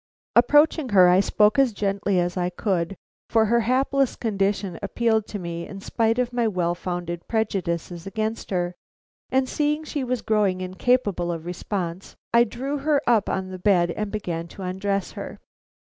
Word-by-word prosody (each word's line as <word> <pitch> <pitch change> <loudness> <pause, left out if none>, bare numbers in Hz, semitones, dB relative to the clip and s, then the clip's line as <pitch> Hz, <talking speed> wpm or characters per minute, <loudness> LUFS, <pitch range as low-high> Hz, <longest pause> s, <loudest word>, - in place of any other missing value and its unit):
Approaching 295 +3 +4
her, 185 -4 +7
I 180 +1 +5
spoke 210 +5 +3
as 265 -4 +4
gently 200 -1 0
as 175 0 -1
I 180 -1 0
could, 180 -1 -1 0.3
for 225 -1 +4
her 235 +2 +3
hapless 265 +3 +1
condition 195 -4 -1
appealed 220 +1 0
to 210 - -5
me 170 -2 -5
in 195 - -8
spite 225 +3 0
of 245 -1 0
my 240 -2 +1
well 180 -4 0
founded 175 -1 -5
prejudices 180 -5 -2
against 220 +2 -3
her; 175 -2 -1 0.6
and 260 0 +2
seeing 300 +2 0
she 295 -2 -3
was 255 -1 -2
growing 205 -4 +1
incapable 185 -1 0
of 165 -1 -5
response, 180 0 -4 0.2
I 235 0 +6
drew 270 +6 -4
her 295 +1 +2
up 225 -4 +3
on 185 0 -2
the 185 - -7
bed 180 -3 +3
and 210 +3 -3
began 170 -6 -3
to 190 - -10
undress 195 +1 -2
her. - - -8
200 Hz, 170 wpm, -24 LUFS, 180-235 Hz, 0.6 s, her